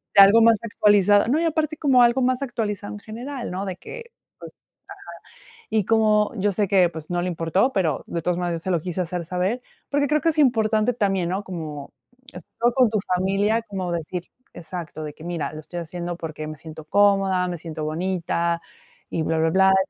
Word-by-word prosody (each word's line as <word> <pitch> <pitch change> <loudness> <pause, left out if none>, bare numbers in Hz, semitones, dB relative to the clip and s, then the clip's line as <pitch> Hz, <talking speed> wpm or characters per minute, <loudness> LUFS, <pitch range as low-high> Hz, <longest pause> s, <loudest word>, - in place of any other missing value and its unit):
de 200 - +10
algo 200 +4 +7
más 225 0 +6
actualizado. 205 -2 +4
No, 280 +6 +2
y - - +1
aparte 310 -1 -1
como 265 -5 +4
algo 240 +2 +3
más 255 +1 +1
actualizado 210 -6 -3
en 210 - -8
general, 240 +4 -6
¿no? 190 +2 -3
De 190 -2 -4
que, 470 - -10 0.3
pues, - - -10 1.0
ajá. - - -21 0.2
Y 215 -2 +1
como, 215 -2 +3
yo 205 +1 +1
sé 205 +1 0
que, 185 -2 +4
pues, 160 -2 -9
no 175 0 0
le 180 - -1
importó, 175 - +1
pero, 165 - 0
de 170 - -3
todas 175 +1 0
maneras 175 -2 -2
se 185 - -3
lo 175 -3 +1
quise 180 +1 -3
hacer 175 0 -4
saber. 185 +8 -2 0.3
Porque, 285 0 +2
creo 300 +2 +2
que 330 - +1
es 315 - -6
importante 225 -4 +3
también, 195 -6 0
¿no? 190 +3 -2
Como 155 -6 -7 0.4
esto 240 +1 -2
con 255 -4 +4
tu 215 - +1 0.2
familia, 200 +5 +1
como 190 -5 -4
decir 170 +1 -4 0.3
exacto, 165 -2 -7
de 150 -1 -7
que: 160 - -13
"Mira, 165 -5 -3
lo 155 - -7
estoy 175 +3 -7
haciendo, 175 +1 -5
porque, 155 -2 -6
me 155 0 -7
siento 155 +1 -10
cómoda, 195 0 +3
me 175 - -3
siento 160 -2 -6
bonita 170 +1 -1 0.5
y 165 - -1
bla 160 0 0
bla 160 0 +2
blá". 190 +2 +5
190 Hz, 205 wpm, -23 LUFS, 170-220 Hz, 1.0 s, de